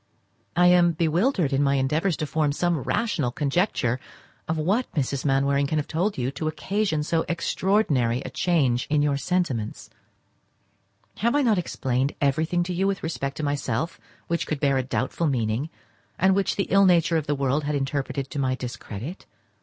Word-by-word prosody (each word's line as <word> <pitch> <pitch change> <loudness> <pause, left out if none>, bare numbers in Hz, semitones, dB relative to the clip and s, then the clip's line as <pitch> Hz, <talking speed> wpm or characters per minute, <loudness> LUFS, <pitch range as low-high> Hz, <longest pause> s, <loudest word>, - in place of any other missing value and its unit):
I 180 - +4
am 175 -1 +5
bewildered 170 - +1
in 135 - +2
my 140 -1 +3
endeavours 155 +6 +1
to 155 - -2
form 150 -1 0
some 175 +1 0
rational 155 - 0
conjecture 135 - 0 0.5
of 160 - -1
what 200 +11 0
Mrs. 140 -1 -1
Mainwaring 140 0 +2
can 155 - -1
have 150 - 0
told 185 +6 -1
you 130 +1 -1
to 155 +3 -4
occasion 155 +1 -1
so 165 +2 0
extraordinary 170 - +1
a - - -7
change 140 -9 +1
in 150 -1 +2
your 145 -1 +2
sentiments. 140 -9 -2 1.3
Have 235 +5 +1
I 290 - +3
not 220 -6 +3
explained 135 -5 -1
everything 160 +5 +1
to 180 +1 -4
you 190 +3 +1
with 195 -1 -2
respect 140 -4 -3
to 155 - -4
myself 145 +1 -2 0.3
which 170 0 -2
could 155 - -2
bear 140 -2 +2
a - - -1
doubtful 130 +5 -1
meaning, 120 +1 -1 0.5
and 190 +1 +4
which 195 0 +1
the 195 - -1
ill 195 0 +6
nature 170 -2 +4
of 155 - -3
the 145 - +1
world 140 +2 0
had 150 0 -1
interpreted 135 -1 -2
to 145 - -3
my 130 -1 +1
discredit? 125 - -7
150 Hz, 175 wpm, -25 LUFS, 135-175 Hz, 1.3 s, ill